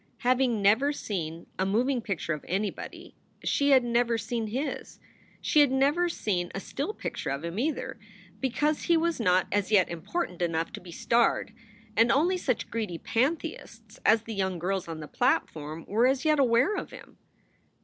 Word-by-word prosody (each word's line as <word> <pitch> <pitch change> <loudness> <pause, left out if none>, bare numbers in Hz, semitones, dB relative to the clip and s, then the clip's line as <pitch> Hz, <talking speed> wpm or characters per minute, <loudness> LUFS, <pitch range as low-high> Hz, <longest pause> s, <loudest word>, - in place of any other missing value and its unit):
Having 250 -4 +2
never 225 +9 +4
seen 170 - -4
a - - +3
moving 240 +6 +1
picture 190 -6 -2
of 150 - -6
anybody, 195 +3 -4 0.3
she 285 0 +2
had 265 -3 +6
never 235 -1 +1
seen 225 0 -3
his. 265 +7 -4 0.4
She 305 - +3
had 290 -2 +6
never 290 +7 +2
seen 180 - -1
a - - -2
still 285 - -4
picture 430 - -5
of 140 +3 -3
him, 170 +5 -4
either, 280 -4 -2 0.4
because 295 +5 0
he 340 - +4
was 335 -2 0
not 185 -4 +3
as 205 +1 0
yet 195 -4 +5
important 175 - -4
enough 165 -1 0
to - - -7
be 175 -1 -11
starred, 230 +3 +1 0.4
and 230 +2 +5
only 335 +7 +3
such 255 -8 -2
greedy 215 -7 -3
pantheists 235 - -3
as 220 0 +4
the 225 - -6
young 190 -3 -1
girls 185 +2 -2
on 160 -1 -6
the 150 - -7
platform 160 - -1
were 230 +5 +3
as 265 +3 0
yet 305 -1 +3
aware 255 - +4
of - - -4
him. - - -13
230 Hz, 175 wpm, -28 LUFS, 185-270 Hz, 0.4 s, had